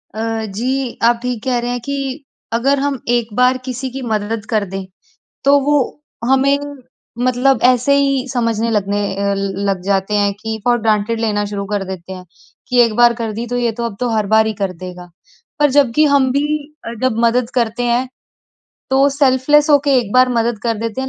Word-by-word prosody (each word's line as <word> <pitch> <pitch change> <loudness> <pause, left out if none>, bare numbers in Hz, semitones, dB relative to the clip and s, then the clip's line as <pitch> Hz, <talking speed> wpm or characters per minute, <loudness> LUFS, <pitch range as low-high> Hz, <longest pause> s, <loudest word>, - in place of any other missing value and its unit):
अ, 225 0 -2
जी 245 +5 -3
आप 235 0 +4
ठीक 245 -3 -3
कह 255 -2 0
रहे 240 +1 -3
हैं 245 - -2
कि 280 0 -4 0.3
अगर 270 +4 +2
हम 280 -1 -1 0.2
एक 235 -2 0
बार 250 +2 +3
किसी 260 0 -4
की 265 +2 -7
मदद 220 -2 -2
कर 215 -3 +1
दें, 195 0 -6 0.6
तो 280 +1 +5
वो 290 +2 +2 0.5
हमें 270 +1 +3 0.7
मतलब 255 0 +2
ऐसे 250 +2 +4
ही 275 -2 +1
समझने 230 -2 0
लगने 205 -1 0 0.2
अ, 200 0 0
लग 195 -1 -2
जाते 195 +1 0
हैं 205 -1 +2
कि 220 0 -4
फॉर 240 0 +3
ग्रांटेड 220 +1 0
लेना 210 -2 0
शुरू 200 -1 -4
कर 205 -1 0
देते 190 -1 -7
हैं 185 -1 -10 0.4
कि 250 0 +1
एक 230 -2 +3
बार 240 0 +5
कर 230 -2 -4
दी 235 - -3
तो 245 - -2
ये 240 -1 +1
तो 235 - -1
अब 230 -4 -4
तो 245 - -1
हर 215 -3 0
बार 220 0 +5
ही 220 - -2
कर 195 -2 0
देगा। 180 -1 -9 0.5
पर 295 -1 +4
जब 275 -3 +3
कि 305 - +5
हम 270 -2 +3
भी 280 +3 +1 0.4
अ, 230 - -5
जब 255 -3 +1
मदद 235 +1 +1
करते 235 -1 0
हैं, 240 +2 +1 0.8
तो 270 +1 +4
सेल्फलेस 280 +1 +3
हो 290 - +7
के 280 -2 +3
एक 220 -5 -3
बार 255 0 +5
मदद 235 -2 0
कर 230 -2 0
देते 230 +2 -3
हैं, 265 - -3
235 Hz, 205 wpm, -17 LUFS, 215-260 Hz, 0.8 s, हो